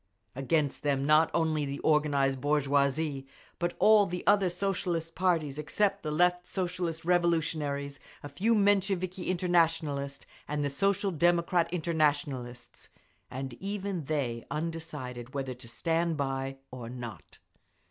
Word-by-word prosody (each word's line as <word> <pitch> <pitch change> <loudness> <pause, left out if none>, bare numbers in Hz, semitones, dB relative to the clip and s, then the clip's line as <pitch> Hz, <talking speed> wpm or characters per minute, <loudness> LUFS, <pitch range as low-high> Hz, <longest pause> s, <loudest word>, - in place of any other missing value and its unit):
Against 140 +2 0
them 140 -2 0
not 155 +2 +5
only 160 -2 +1
the 140 0 -4
organised 140 -4 +2
bourgeoisie, 140 0 +1 0.3
but 175 0 -1
all 215 -2 +6
the 180 +1 -5
other 200 -2 +4
Socialist 175 -3 -2
parties 165 -6 0
except 200 +6 0
the 155 - -4
Left 180 +3 +2
Socialist 175 -3 -3
Revolutionaries, 155 -5 0 0.2
a - - -5
few 205 +12 +1
Mensheviki 195 -3 +1
Internationalists 160 -6 0 0.2
and 145 0 -1
the 140 - -1
Social 195 +6 +1
Democrat 170 +1 +2
Internationalists, 145 -7 -1 0.4
and 130 0 -5
even 195 -4 -3
they 130 -6 -2
undecided 150 -6 -5
whether 135 -2 -2
to 125 -1 -13
stand 165 +6 0
by 135 -1 -2
or 125 -2 -7
not. 120 -2 -9
155 Hz, 125 wpm, -30 LUFS, 140-175 Hz, 0.4 s, all